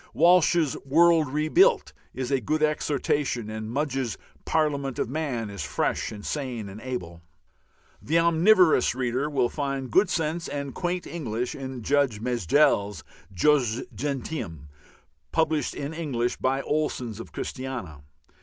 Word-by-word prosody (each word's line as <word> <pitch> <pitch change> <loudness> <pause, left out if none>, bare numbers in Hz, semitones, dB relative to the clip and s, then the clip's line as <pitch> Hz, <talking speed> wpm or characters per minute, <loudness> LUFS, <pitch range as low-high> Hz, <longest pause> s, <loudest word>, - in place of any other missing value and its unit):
Walsh's 170 -2 +4
"World 165 +2 +4
Rebuilt" 155 - +3 0.2
is 130 0 -4
a 135 -2 +2
good 155 +7 0
exhortation, 145 -6 0
and 110 0 -5
Mugge's 135 -3 -2 0.3
"Parliament 140 -4 0
of - - -1
Man" 130 -6 -3
is 100 -4 -6
fresh 70 +1 -1
and 105 -1 -9
sane 125 -8 -3
and 100 +3 -10
able. 90 -10 -6 0.8
The 160 +4 +1
omnivorous 170 - +4
reader 130 +3 -1
will 135 -4 +2
find 135 -2 -3
good 190 0 +4
sense 165 -1 -1
and 140 -2 -4
quaint 175 0 -2
English 125 -7 -3
in 130 -3 -6
Judge 140 -5 +2
Mejdell's 110 - +2 0.3
"Jus 120 - +2
Gentium," 125 - -4 0.6
published 160 -3 0
in 145 +2 -4
English 135 -7 -2
by 135 +1 0
Olsen's 130 -7 -2
of 115 - -9
Christiania. 125 - -6
135 Hz, 130 wpm, -26 LUFS, 120-155 Hz, 0.8 s, Walsh's